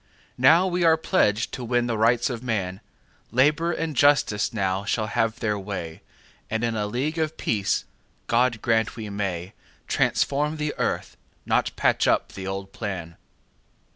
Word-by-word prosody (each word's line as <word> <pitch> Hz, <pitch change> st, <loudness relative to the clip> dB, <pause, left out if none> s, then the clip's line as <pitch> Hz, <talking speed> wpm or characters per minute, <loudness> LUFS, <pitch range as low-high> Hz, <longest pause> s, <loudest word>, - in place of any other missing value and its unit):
Now 160 Hz, +8 st, +6 dB
are 185 Hz, -, -1 dB
we 170 Hz, -2 st, +4 dB
pledged 115 Hz, -, +1 dB
to 125 Hz, -, -5 dB
win 120 Hz, 0 st, +1 dB
the 120 Hz, -1 st, -1 dB
Rights 115 Hz, +4 st, +2 dB
of 120 Hz, -2 st, -5 dB
man; 100 Hz, -6 st, -2 dB, 0.5 s
Labour 150 Hz, +8 st, +3 dB
and 160 Hz, -2 st, -3 dB
Justice 130 Hz, -6 st, +3 dB
now 95 Hz, -3 st, -1 dB
shall 110 Hz, +2 st, 0 dB
have 115 Hz, 0 st, -1 dB
their 105 Hz, -2 st, -1 dB
way, 95 Hz, -5 st, -6 dB, 0.5 s
And 110 Hz, +1 st, -1 dB
in 115 Hz, -1 st, 0 dB
a 105 Hz, -1 st, -1 dB
League 140 Hz, +9 st, -2 dB
of 160 Hz, 0 st, -1 dB
Peace—God 115 Hz, +2 st, -1 dB
grant 110 Hz, -1 st, +1 dB
we 110 Hz, -3 st, -6 dB
may—Transform 100 Hz, -, -2 dB
the 150 Hz, -1 st, -2 dB
earth, -, -, -2 dB, 0.3 s
not -, -, +1 dB
patch -, -, +2 dB
up -, -, +2 dB
the 95 Hz, -1 st, -7 dB
old 95 Hz, 0 st, -5 dB
plan. 90 Hz, -6 st, -5 dB
115 Hz, 150 wpm, -25 LUFS, 100-140 Hz, 0.5 s, Now